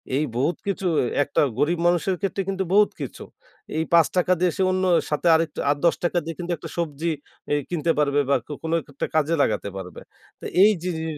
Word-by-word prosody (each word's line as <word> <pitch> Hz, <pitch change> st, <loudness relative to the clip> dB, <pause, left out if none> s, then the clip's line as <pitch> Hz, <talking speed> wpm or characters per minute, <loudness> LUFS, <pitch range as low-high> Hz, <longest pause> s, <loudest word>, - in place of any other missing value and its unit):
এই 150 Hz, -, +2 dB
বহুত 145 Hz, +6 st, 0 dB
কিছু 195 Hz, -1 st, -2 dB, 0.4 s
একটা 145 Hz, -, 0 dB, 0.2 s
গরিব 165 Hz, +3 st, +1 dB
মানুষের 175 Hz, +2 st, +1 dB
ক্ষেত্রে 195 Hz, 0 st, -1 dB
কিন্তু 190 Hz, 0 st, -1 dB
বহুত 210 Hz, 0 st, +5 dB
কিছু। -, -, -6 dB, 0.5 s
এই 160 Hz, -, +1 dB
৫ 165 Hz, -2 st, +6 dB
টাকা 180 Hz, 0 st, +2 dB
দিয়ে 180 Hz, -1 st, +2 dB
সে -, -, 0 dB
অন্য 185 Hz, 0 st, 0 dB, 0.3 s
সাথে 150 Hz, +3 st, 0 dB
আরেকটু 160 Hz, -1 st, -1 dB
আর 145 Hz, -, +3 dB
১০ 170 Hz, -, +4 dB
টাকা 175 Hz, 0 st, 0 dB
দিয়ে 165 Hz, -1 st, -5 dB
কিন্তু 175 Hz, 0 st, -4 dB
একটা 165 Hz, -, -9 dB
সবজি 165 Hz, 0 st, -2 dB, 0.4 s
এই 145 Hz, -, +2 dB
কিনতে 170 Hz, -1 st, 0 dB
পারবে 145 Hz, -1 st, +2 dB
বা 140 Hz, -, +4 dB, 0.3 s
কোনো 160 Hz, 0 st, -2 dB
একটা 145 Hz, -1 st, -5 dB
কাজে 155 Hz, +2 st, +2 dB
লাগাতে 105 Hz, -5 st, 0 dB
পারবে। 90 Hz, -1 st, -8 dB, 0.4 s
তো -, -, -10 dB, 0.2 s
এই 210 Hz, +2 st, +8 dB
যে 180 Hz, -, -1 dB
যে -, -, -4 dB
165 Hz, 205 wpm, -23 LUFS, 150-180 Hz, 0.5 s, এই